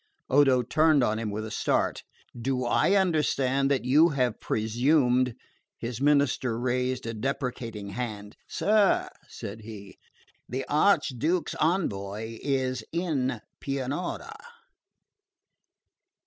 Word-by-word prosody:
Odo 135 -2 +5
turned 155 +2 +3
on 110 -2 +1
him 110 -2 -3
with 105 +1 -4
a 110 - -7
start. - - 0 0.3
"Do 125 +1 -2
I 190 +10 +3
understand 140 -7 +2
that 135 -3 0
you 150 +6 +5
have 125 -6 0
presumed 125 +2 +2 0.2
?" - - -43
His 120 +1 -5
minister 140 -5 +2
raised 125 0 -1
a 115 - -3
deprecating 115 -3 -4
hand. 105 -1 -5
"Sir," 210 -1 +2 0.2
said 105 +2 -8
he, 105 -3 -11 0.5
"the 130 +2 -3
Archduke's 155 - +2
envoy 110 - -1
is 130 -4 -1
in 140 -9 -1 0.2
Pianura." 140 +5 -3
130 Hz, 110 wpm, -27 LUFS, 115-145 Hz, 0.5 s, Odo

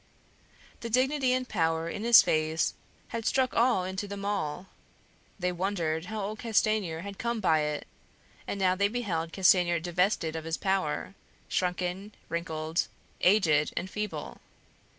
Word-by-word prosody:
The 230 - -5
dignity 260 +2 +2
and 255 0 0
power 165 -5 0
in 205 +5 -4
his 235 0 +8
face 155 +1 +1 0.4
had 230 -1 -4
struck 260 +2 +1
awe 235 -5 +3
into 190 +2 -4
them 200 0 -6
all; 190 -5 -2 0.7
they 180 -2 -1
wondered 175 -3 -1
how 215 +2 -4
old 215 +2 -4
Castanier 215 -7 +1
had 200 +1 -8
come 235 -1 -1
by 160 -6 +3
it; 150 -1 -2 0.6
and 200 - -3
now 185 -1 +3
they 200 +2 +2
beheld 190 -8 -2
Castanier 180 -2 +4
divested 175 -1 0
of 160 0 -5
his 165 0 -2
power, 190 -2 -1 0.3
shrunken, 180 +3 -2
wrinkled, 160 -1 -2 0.3
aged, 165 -6 +3
and 190 - -3
feeble. 210 -1 -5
190 Hz, 145 wpm, -29 LUFS, 165-215 Hz, 0.7 s, his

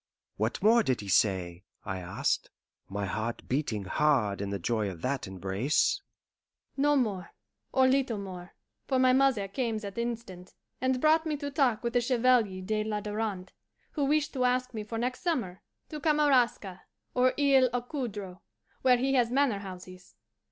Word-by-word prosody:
"What 110 - -2
more 230 +3 +6
did 130 - 0
he 100 - -8
say?" 90 -2 +1 0.2
I 95 - -3
asked, 85 -1 -1 0.4
my 100 +1 -3
heart 110 +5 -3
beating 125 -7 -1
hard 110 -4 +1
in 100 - -3
the 100 - -2
joy 105 +2 -1
of 85 -3 -9
that 135 -3 -2
embrace. 95 - 0 0.7
"No 290 +1 +3
more, 205 -10 -1 0.4
or 260 -1 +4
little 260 -4 +1
more, 185 -3 -8 0.3
for 265 - +1
my 255 0 +4
mother 260 -7 +3
came 225 +2 -2
that 205 0 -6
instant 230 -6 -5 0.3
and 260 0 +1
brought 315 +3 +3
me 305 -1 -1
to 285 0 -5
talk 255 -6 +1
with 235 0 -2
the 245 - +3
Chevalier 235 -6 +2
de 215 +2 -1
la 215 -1 -2
Darante, 210 -3 -4 0.4
who 290 -3 -1
wished 300 +1 +1
to 255 -3 0
ask 255 0 +1
me 215 -2 -4
for 225 +2 -5
next 250 +2 -2
summer 245 - -2 0.3
to 305 - -6
Kamaraska 265 - +2 0.3
or 255 0 +3
Isle 270 -3 +5
aux 245 0 -1
Coudres, 210 -9 -5 0.4
where 255 -1 +5
he 270 +2 0
has 245 -3 +3
manorhouses. 195 -8 -3
220 Hz, 165 wpm, -29 LUFS, 170-255 Hz, 0.7 s, more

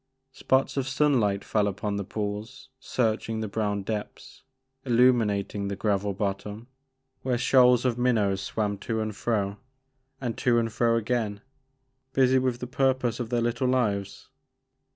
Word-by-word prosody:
Spots 130 +2 0
of 135 -1 0
sun 140 0 +2
light 100 -2 0
fell 105 -2 +1
upon 100 +1 -2
the 100 - -2
pools, 105 +6 -5
searching 115 -3 -1
the 110 - -2
brown 105 -1 -2
depths, 105 +1 -6 0.4
illuminating 115 -5 +2
the 100 - -3
gravel 100 -1 0
bottom 100 +2 -3 0.6
where 125 -2 0
shoals 125 0 +4
of 125 -1 0
minnows 105 -6 +2
swam 105 0 -2
to 115 0 -2
and 110 -1 -3
fro, 100 -2 -1 0.6
and 120 -4 -3
to 120 -2 +3
and 115 -1 0
fro 115 0 +2
again, 110 -3 -1 0.7
busy 130 0 +4
with 130 -2 0
the 125 - -5
purpose 125 -2 0
of 120 -2 -4
their 120 -1 +1
little 120 +2 0
lives. 105 -6 -1
115 Hz, 150 wpm, -27 LUFS, 105-125 Hz, 0.7 s, shoals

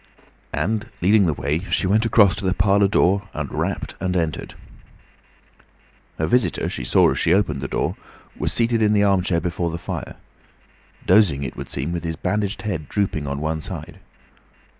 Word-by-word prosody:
And 110 +3 -2
leading 100 +1 +4
the 80 - +1
way, 75 +3 -1
she - - +1
went 110 +4 +2
across 105 -4 +5
to 100 - -3
the 95 0 +1
parlour 100 +1 +3
door 100 0 +2
and - - -4
rapped - - -2
and 95 -1 -1
entered. 80 -2 -3 1.6
Her 80 - 0
visitor, 125 +10 +1
she - - -5
saw - - +4
as - - -2
she 85 - +3
opened 80 -9 0
the 70 - -3
door, - - -2 0.4
was - - -1
seated 115 -1 +1
in 105 -1 +3
the 105 -1 +3
armchair 95 -3 +2
before 85 0 -2
the 85 - -4
fire, - - -6 0.9
dozing 90 -8 +4
it 65 - -5
would - - -7
seem, 70 +5 -3
with 85 -1 -3
his 80 -1 -3
bandaged 100 +3 -2
head 90 -8 -4
drooping 95 -8 -1
on 70 +1 -3
one 80 0 -2
side. - - -7
95 Hz, 180 wpm, -22 LUFS, 80-105 Hz, 1.6 s, across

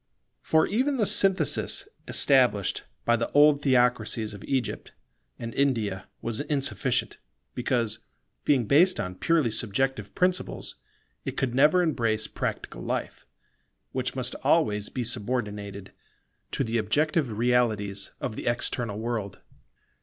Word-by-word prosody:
For 160 0 +3
even 265 +6 0
the 220 - +2
synthesis 190 -6 +2 0.2
established 125 -8 +2 0.2
by 120 - +4
the 115 0 -2
old 145 0 +6
theocracies 120 -5 +1
of 100 - -10
Egypt 130 -4 -2 0.4
and 115 -1 -6
India 115 -8 0 0.2
was 115 -1 -2
insufficient, 140 -8 -1 0.3
because, 120 -3 -1 0.4
being 130 -5 +2
based 175 - +4
on 90 - -3
purely 140 - +1
subjective 115 +1 -1
principles 180 0 -1 0.5
it - - -5
could 130 -3 -1
never 150 +7 +5
embrace 115 -9 0
practical - - -4
life, - - -4 0.6
which - - -3
must - - -2
always 105 0 +2
be 125 - -3
subordinated 105 -4 -3 0.6
to - - -1
the 115 -1 0
objective 145 +1 0
realities 110 -5 +1
of 110 - -4
the - - -6
external 120 -2 -1
world. 110 -3 -4
120 Hz, 125 wpm, -27 LUFS, 110-140 Hz, 0.6 s, old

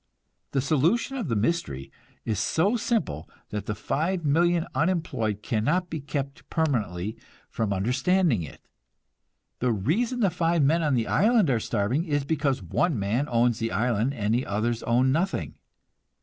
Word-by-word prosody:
The 135 - 0
solution 165 - +1
of 235 - -3
the 115 - 0
mystery 105 - -1 0.3
is 110 -4 -1
so 165 - +2
simple 220 - -1 0.2
that 105 -1 -5
the 105 - -2
5,000,000 165 - +1
unemployed 130 - -1
cannot 150 +11 0
be 160 - -3
kept 140 0 -5
permanently 110 - -1 0.3
from 110 -3 -1
understanding 125 - +2
it. 75 - -10 0.9
The 125 0 +1
reason 200 - 0
the 195 -4 +3
five 165 -1 +1
men 160 +5 +3
on 150 -4 +2
the 115 -2 +1
island 215 - +3
are 120 - +2
starving 115 - 0
is 145 -4 -1
because 140 -6 0
one 150 - 0
man 110 +8 0
owns 120 -1 +2
the 115 0 -2
island 120 +3 0
and 105 -2 0
the 125 +3 0
others 110 +3 -1
own 125 +3 +2
nothing. 175 +7 -1
135 Hz, 150 wpm, -26 LUFS, 110-170 Hz, 0.9 s, the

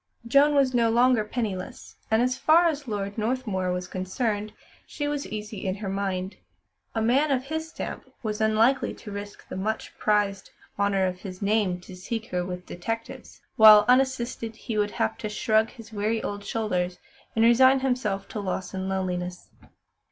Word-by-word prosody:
Joan 280 +5 +4
was 270 -2 +3
no 235 -2 +3
longer 240 0 +4
penniless, 210 -4 -5
and 220 +2 +3
as 255 0 +1
far 315 +6 +5
as 295 -4 -1
Lord 205 -1 -3
Northmuir 215 -6 -1
was 180 0 -3
concerned, 205 +3 -2 0.4
she 290 -1 -3
was 290 -1 -2
easy 210 -1 -6
in 185 - 0
her 200 -1 -5
mind. 195 -1 -3 0.6
A 225 - +1
man 270 +7 +3
of 260 -2 +1
his 315 +3 -4
stamp - - -7
was 215 -1 -3
unlikely 220 +4 +2
to 210 - -10
risk 205 0 -8
the - - -7
much 215 +4 -3
prized 205 -2 +1 0.3
"honour 200 -1 +2
of 180 -1 -3
his 185 0 -7
name" 200 -3 +1
to 185 - -11
seek 220 +5 -4
her 180 -1 0
with 180 0 -6
detectives; 225 +6 -6 0.2
while, 215 -1 +9
unassisted, 250 -3 +1
he 230 0 -5
would 210 -1 +1
have 110 - 0
to 215 - -3
shrug 220 +1 +2
his 230 -2 -13
weary 215 +2 -1
old 205 0 -4
shoulders 185 -6 -1 0.4
and 225 0 +4
resign 260 +3 +6
himself 250 -7 -1
to 215 - -5
loss 190 -1 -3
and 190 0 -3
loneliness. 180 -2 -3
215 Hz, 175 wpm, -26 LUFS, 195-245 Hz, 0.6 s, while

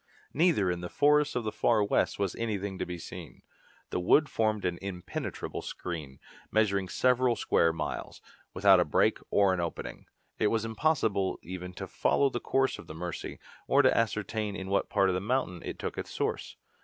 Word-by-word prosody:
Neither 150 - +3
in 90 0 -3
the 90 - -5
forests 150 0 +3
of 125 - 0
the 110 - -2
Far 110 -2 +2
West 100 - +1
was 100 -3 -1
anything 100 -4 -3
to - - -2
be 90 0 -5
seen. 85 0 -10 0.5
The - - 0
wood 140 - +4
formed 110 -2 0
an 90 -1 -1
impenetrable 95 -2 -5
screen, 75 -7 -6 0.3
measuring 100 -4 +1
several 125 -1 +3
square 85 -5 +2
miles, 80 -1 -5 0.3
without 95 0 +5
a - - +5
break 75 - +2
or 100 -2 +4
an 90 - -1
opening. 85 -1 -5 0.3
It - - +3
was 115 +1 0
impossible 110 -6 +1
even 90 0 -7
to - - -6
follow 140 -1 +1
the 120 - -2
course 135 +1 0
of - - -11
the 80 - -8
Mercy, 90 +1 -5 0.3
or - - +5
to - - +4
ascertain 110 -2 -1
in 95 -1 -6
what 100 - +1
part 95 - +3
of - - +1
the 90 - -1
mountain 105 -5 -1
it - - -5
took - - -4
its - - -5
source. - - -3
100 Hz, 190 wpm, -29 LUFS, 90-115 Hz, 0.5 s, without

